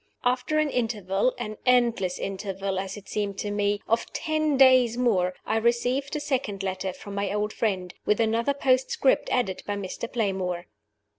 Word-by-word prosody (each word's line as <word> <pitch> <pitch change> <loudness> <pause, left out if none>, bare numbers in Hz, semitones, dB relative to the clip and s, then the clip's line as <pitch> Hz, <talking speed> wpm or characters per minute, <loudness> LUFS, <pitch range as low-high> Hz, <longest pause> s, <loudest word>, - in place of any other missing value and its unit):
After 250 +5 +1
an 305 -2 +2
interval 220 -2 0
an 215 -3 -5
endless 235 -7 +2
interval, 195 -1 -3
as 195 +1 -5
it 205 - -12
seemed 200 -2 -2
to 205 - -3
me 205 0 +1
of 230 +1 0
ten 310 -2 0
days 255 -3 +6
more, 185 -8 +2
I 220 - +1
received 245 +5 +1
a - - 0
second 250 -9 -2
letter 190 0 -2
from 200 +2 -10
my 200 0 -1
old 210 +1 -1
friend, 185 -5 -1
with 210 - +1
another 230 +5 +1
postscript 265 0 +2
added 205 -7 0
by 205 - -1
Mr. 200 +3 -5
Playmore. 190 -6 -1
215 Hz, 165 wpm, -26 LUFS, 195-250 Hz, -, days